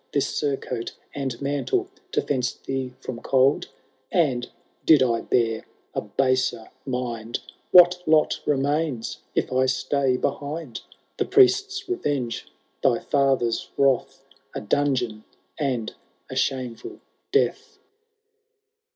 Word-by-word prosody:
This 140 Hz, -, 0 dB
surcoat 130 Hz, -4 st, -2 dB, 0.2 s
and 135 Hz, -4 st, -3 dB
mantle 145 Hz, -, 0 dB, 0.3 s
to -, -, +2 dB
fence 130 Hz, -3 st, 0 dB
thee 130 Hz, -1 st, -4 dB
from 125 Hz, -3 st, -6 dB
cold? 135 Hz, +1 st, +3 dB, 0.4 s
And, 130 Hz, -8 st, +1 dB, 0.3 s
did 150 Hz, -5 st, +6 dB
I 115 Hz, -2 st, +1 dB
bear 115 Hz, -2 st, +1 dB, 0.3 s
a -, -, -1 dB
baser 130 Hz, -3 st, 0 dB, 0.2 s
mind. 120 Hz, -3 st, -3 dB, 0.3 s
What 180 Hz, 0 st, +7 dB
lot 155 Hz, -1 st, +3 dB
remains 145 Hz, -3 st, 0 dB, 0.2 s
if -, -, 0 dB
I 130 Hz, 0 st, +3 dB
stay 130 Hz, 0 st, +1 dB
behind? 145 Hz, -2 st, -3 dB, 0.4 s
The -, -, +1 dB
priests* 390 Hz, 0 st, +4 dB
revenge, 140 Hz, -, -2 dB, 0.3 s
thy -, -, +3 dB
fathered 135 Hz, -4 st, +2 dB, 0.2 s
wrath, 135 Hz, 0 st, +1 dB, 0.3 s
A -, -, -3 dB
dungeon, 120 Hz, -2 st, 0 dB, 0.4 s
and 125 Hz, -7 st, -1 dB, 0.4 s
a -, -, -5 dB
shameful 125 Hz, -3 st, -2 dB, 0.3 s
death. 450 Hz, -2 st, 0 dB
135 Hz, 110 wpm, -24 LUFS, 125-145 Hz, 0.4 s, What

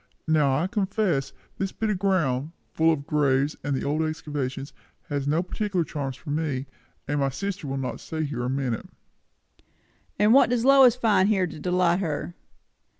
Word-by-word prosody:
Now 150 Hz, -4 st, +3 dB
I 160 Hz, -, +1 dB
confess, 190 Hz, -, 0 dB, 0.3 s
this 195 Hz, -1 st, -1 dB
bit 220 Hz, -1 st, -1 dB
of 190 Hz, -, -2 dB
ground, 160 Hz, -7 st, 0 dB, 0.2 s
full 160 Hz, +1 st, +3 dB
of 140 Hz, -3 st, -2 dB
graves 145 Hz, -1 st, +1 dB
and 140 Hz, -2 st, -1 dB
old 150 Hz, +3 st, 0 dB
excavations, 145 Hz, -3 st, -3 dB, 0.4 s
has 140 Hz, -2 st, -2 dB
no 155 Hz, +4 st, +2 dB
particular 190 Hz, -2 st, -1 dB
charms 140 Hz, -3 st, -4 dB
for 150 Hz, -, -7 dB
me; 145 Hz, -4 st, -1 dB, 0.4 s
and 145 Hz, +1 st, 0 dB
my 135 Hz, -1 st, +2 dB
sister 185 Hz, +2 st, -4 dB
will 135 Hz, 0 st, -3 dB
not 135 Hz, -1 st, -4 dB
stay 160 Hz, -1 st, -4 dB
here 140 Hz, -5 st, -3 dB
a 125 Hz, -, -1 dB
minute." 130 Hz, -3 st, -2 dB, 1.3 s
"And 210 Hz, +3 st, +5 dB
what 275 Hz, -, +6 dB
does 245 Hz, -1 st, +1 dB
Lois 270 Hz, -3 st, +7 dB
find 215 Hz, -5 st, +3 dB
here 195 Hz, -4 st, +2 dB
to 160 Hz, -, -8 dB
delight 180 Hz, +1 st, +2 dB
her? 160 Hz, -2 st, -3 dB
155 Hz, 170 wpm, -25 LUFS, 140-190 Hz, 1.3 s, Lois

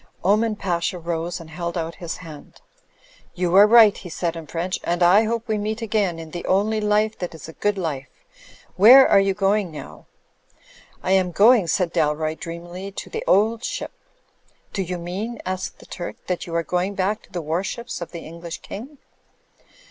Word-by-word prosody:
Oman 215 Hz, +4 st, +2 dB
Pasha 180 Hz, -2 st, -2 dB
rose 170 Hz, +1 st, -3 dB
and 160 Hz, -1 st, -12 dB
held 170 Hz, +1 st, -4 dB
out 165 Hz, 0 st, -3 dB
his 170 Hz, -2 st, -4 dB
hand. 155 Hz, -3 st, -12 dB, 0.8 s
"You 175 Hz, -1 st, -1 dB
are 205 Hz, +2 st, +9 dB
right/' 220 Hz, -2 st, +7 dB
he 180 Hz, -, -9 dB
said 170 Hz, 0 st, -2 dB
in 165 Hz, -2 st, -8 dB
French, 175 Hz, +4 st, -3 dB
"and 175 Hz, +1 st, 0 dB
I 195 Hz, +6 st, +6 dB
hope 230 Hz, +2 st, -2 dB
we 215 Hz, -1 st, 0 dB
meet 215 Hz, +2 st, -3 dB
again 205 Hz, -6 st, 0 dB
in 160 Hz, -1 st, -9 dB
the 175 Hz, -, -6 dB
only 215 Hz, +3 st, +1 dB
life 210 Hz, +1 st, +1 dB
that 175 Hz, -2 st, -5 dB
is 160 Hz, -, -10 dB
a 160 Hz, -, -10 dB
good 205 Hz, +3 st, -1 dB
life. 145 Hz, -7 st, -3 dB, 0.7 s
Where 250 Hz, +8 st, +9 dB
are 200 Hz, -, +6 dB
you 195 Hz, -1 st, +1 dB
going 200 Hz, -1 st, +1 dB
now?" 80 Hz, -, -10 dB, 1.0 s
"I 185 Hz, -, -1 dB
am 190 Hz, -1 st, +3 dB
going," 210 Hz, +1 st, +5 dB
said 170 Hz, +1 st, 0 dB
Dalroy, 155 Hz, -1 st, +1 dB
dreamily, 175 Hz, +3 st, -7 dB
"to -, -, -7 dB
The -, -, -4 dB
Old 220 Hz, +5 st, +3 dB
Ship/ -, -, -4 dB, 0.5 s
" -, -, -38 dB
"Do 195 Hz, -, -1 dB
you 180 Hz, -1 st, -3 dB
mean?" 195 Hz, +7 st, -5 dB
asked 185 Hz, 0 st, -4 dB
the -, -, -16 dB
Turk, 175 Hz, -, -6 dB
"that 180 Hz, -1 st, -3 dB
you 165 Hz, -, -5 dB
are 170 Hz, -, +1 dB
going 180 Hz, +4 st, -1 dB
back 200 Hz, +3 st, 0 dB
to -, -, -22 dB
the 175 Hz, -2 st, -4 dB
warships 185 Hz, +9 st, -3 dB
of 170 Hz, -, -5 dB
the 170 Hz, -, -8 dB
English 170 Hz, +1 st, -8 dB
King?" 265 Hz, +9 st, -9 dB
185 Hz, 195 wpm, -22 LUFS, 170-210 Hz, 1.0 s, are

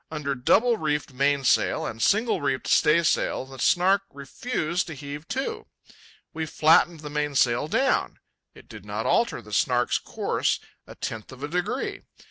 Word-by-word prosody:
Under 150 Hz, -3 st, -3 dB
double 220 Hz, -, +3 dB
reefed 150 Hz, -4 st, -2 dB
mainsail 140 Hz, 0 st, +2 dB
and 115 Hz, -, -6 dB
single 220 Hz, -1 st, +2 dB
reefed 135 Hz, -2 st, -1 dB
staysail 155 Hz, -4 st, +2 dB
the 135 Hz, 0 st, -12 dB
Snark 185 Hz, +8 st, +3 dB
refused 155 Hz, -, -3 dB
to 165 Hz, -, -7 dB
heave 145 Hz, +3 st, -8 dB
to. 265 Hz, +1 st, -4 dB, 0.7 s
We 160 Hz, -1 st, -3 dB
flattened 160 Hz, +1 st, +3 dB
the 150 Hz, -1 st, -7 dB
mainsail 145 Hz, -3 st, +1 dB
down. 265 Hz, +11 st, +1 dB, 0.4 s
It -, -, -16 dB
did -, -, -11 dB
not -, -, -4 dB
alter 230 Hz, -, +1 dB
the 105 Hz, 0 st, -12 dB
Snark's 120 Hz, +3 st, +2 dB
course -, -, -1 dB, 0.3 s
a -, -, -11 dB
tenth 110 Hz, +2 st, -6 dB
of 130 Hz, +1 st, -11 dB
a -, -, -2 dB
degree. 180 Hz, -, -3 dB
150 Hz, 150 wpm, -25 LUFS, 135-175 Hz, 0.7 s, double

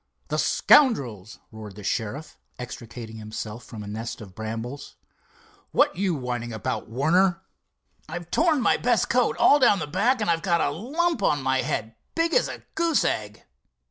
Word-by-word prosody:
"The -, -, -1 dB
scoundrels!" 125 Hz, -, +3 dB
roared 110 Hz, -3 st, -10 dB
the 105 Hz, -, -10 dB
sheriff, 115 Hz, +9 st, -3 dB, 0.2 s
extricating 115 Hz, -2 st, -8 dB
himself 110 Hz, +1 st, -7 dB
from 110 Hz, -3 st, -9 dB
a -, -, -9 dB
nest 110 Hz, +3 st, -5 dB
of 100 Hz, -5 st, -11 dB
brambles. 115 Hz, +6 st, -6 dB, 0.8 s
"What -, -, +3 dB
you 185 Hz, -1 st, 0 dB
whining 120 Hz, -3 st, -4 dB
about, 110 Hz, -2 st, -4 dB
Warner?" 170 Hz, +9 st, +2 dB, 0.7 s
"I've 175 Hz, +1 st, -7 dB
torn 315 Hz, -4 st, +3 dB
my -, -, +3 dB
best 240 Hz, -1 st, +1 dB
coat 250 Hz, 0 st, +2 dB
all 290 Hz, -, +6 dB
down 240 Hz, -6 st, +5 dB
the 170 Hz, -, -3 dB
back, 220 Hz, -, +1 dB
and 210 Hz, -, -1 dB
I've 165 Hz, -1 st, +1 dB
got 170 Hz, -2 st, +1 dB
a -, -, +1 dB
lump 295 Hz, -, -1 dB
on 145 Hz, -7 st, +1 dB
my 130 Hz, 0 st, +2 dB
head 110 Hz, +1 st, -3 dB, 0.2 s
big 330 Hz, 0 st, +1 dB
as -, -, +3 dB
a -, -, -8 dB
goose 330 Hz, -2 st, +2 dB
egg." 105 Hz, -1 st, -2 dB
140 Hz, 170 wpm, -25 LUFS, -, 0.8 s, all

